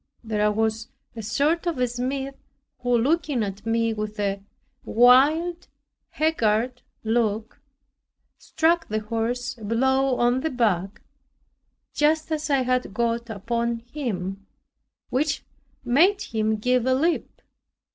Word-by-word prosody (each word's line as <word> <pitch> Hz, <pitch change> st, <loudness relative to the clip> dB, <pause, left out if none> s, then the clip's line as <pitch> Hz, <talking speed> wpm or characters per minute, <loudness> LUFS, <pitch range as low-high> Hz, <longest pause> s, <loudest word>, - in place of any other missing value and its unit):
There 210 Hz, -2 st, +1 dB
was 220 Hz, +1 st, -1 dB, 0.3 s
a 225 Hz, -, -5 dB
sort 295 Hz, -, 0 dB
of 335 Hz, -5 st, -1 dB
a 250 Hz, 0 st, +1 dB
smith, 265 Hz, +3 st, -3 dB, 0.5 s
who 245 Hz, -1 st, +2 dB
looking 280 Hz, -1 st, +1 dB
at 205 Hz, +2 st, -6 dB
me 230 Hz, 0 st, +1 dB
with 215 Hz, 0 st, -5 dB
a 200 Hz, -1 st, -1 dB, 0.4 s
wild 290 Hz, +9 st, +4 dB, 0.4 s
haggard 250 Hz, -5 st, 0 dB, 0.2 s
look, 220 Hz, +1 st, -1 dB, 0.8 s
struck 325 Hz, +1 st, +1 dB
the 215 Hz, 0 st, -2 dB
horse 240 Hz, +4 st, -2 dB
a -, -, -11 dB
blow 265 Hz, +4 st, +2 dB
on 245 Hz, +1 st, +2 dB
the 320 Hz, -, -1 dB
back, 205 Hz, -, -1 dB, 0.9 s
just 310 Hz, +2 st, +1 dB
as 310 Hz, 0 st, -2 dB
I 275 Hz, -2 st, +3 dB
had 255 Hz, -4 st, -1 dB
got 235 Hz, 0 st, -1 dB
upon 235 Hz, +3 st, -2 dB, 0.2 s
him, 195 Hz, -8 st, -4 dB, 0.6 s
which 280 Hz, +3 st, 0 dB, 0.4 s
made 340 Hz, +12 st, +4 dB
him 220 Hz, -1 st, 0 dB
give 250 Hz, +3 st, +1 dB
a 260 Hz, -, +4 dB
leap. 325 Hz, +5 st, -1 dB
240 Hz, 125 wpm, -24 LUFS, 220-275 Hz, 0.9 s, wild